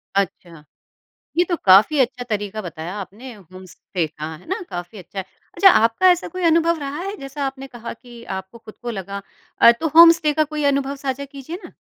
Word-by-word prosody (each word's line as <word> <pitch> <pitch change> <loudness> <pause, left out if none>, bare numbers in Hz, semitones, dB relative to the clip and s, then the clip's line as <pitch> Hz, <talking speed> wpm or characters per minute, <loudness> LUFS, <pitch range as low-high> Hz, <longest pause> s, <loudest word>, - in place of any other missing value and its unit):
अच्छा 175 -5 -3 0.7
ये 350 - +4
तो 345 - 0
काफ़ी 200 +10 +6
अच्छा 250 0 0
तरीका 210 0 -3
बताया 170 +1 -7
आपने 215 +7 -9
होम 185 -1 -14
स्टे 175 -1 -4
का 155 0 -8
है 170 - -19
ना? 380 - -2
काफ़ी 175 +4 -7
अच्छा 190 +2 -10
है। 190 - -3 0.3
अच्छा 385 +2 +7
आपका 230 +9 +4
ऐसा 355 0 +1
कोई 370 0 -6
अनुभव 335 0 +3
रहा 280 +1 -5
है 395 +2 -5
जैसा 275 +1 -5
आपने 270 0 -6
कहा 240 -3 -8
कि 240 0 -14
आपको 190 +5 -9
खुद 215 -1 -13
को 240 - -4
लगा 200 -1 -6 0.4
अ, - - +9
तो 280 +8 -3
होम 335 +1 +10
स्टे 310 -3 0
का 310 +1 +2
कोई 300 -1 -2
अनुभव 275 0 -2
साझा 265 +1 -2
कीजिए 280 +4 -8
ना? - - -11
245 Hz, 205 wpm, -21 LUFS, 195-300 Hz, 0.7 s, होम